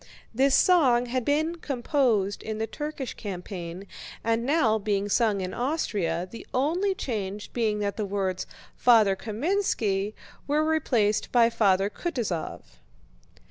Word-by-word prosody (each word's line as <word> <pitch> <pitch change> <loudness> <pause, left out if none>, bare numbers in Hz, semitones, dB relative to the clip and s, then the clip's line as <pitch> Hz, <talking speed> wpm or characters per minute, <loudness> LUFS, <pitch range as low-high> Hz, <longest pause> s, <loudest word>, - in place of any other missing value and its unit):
This 270 +3 +3
song 270 -9 +4
had 250 +1 -2
been 310 +6 0
composed 245 - 0
in 220 -1 -4
the 220 - -1
Turkish 295 0 -5
campaign 180 -2 -6 0.4
and 230 0 +1
now 245 -6 +2
being 200 -1 -1
sung 210 -2 +2
in 185 0 -4
Austria, 200 - -1
the 230 - -10
only 350 +9 +1
change 210 - -4
being 220 -3 0
that 200 +1 -2
the 215 - -1
words 190 -2 -2 0.3
"Father 220 -5 +5
Kámenski" 215 - -1 0.3
were 300 +2 +2
replaced 245 -10 +1
by 235 -1 +5
"Father 195 -4 +3
Kutúzov." 220 - -3
225 Hz, 130 wpm, -26 LUFS, 200-275 Hz, 0.4 s, Father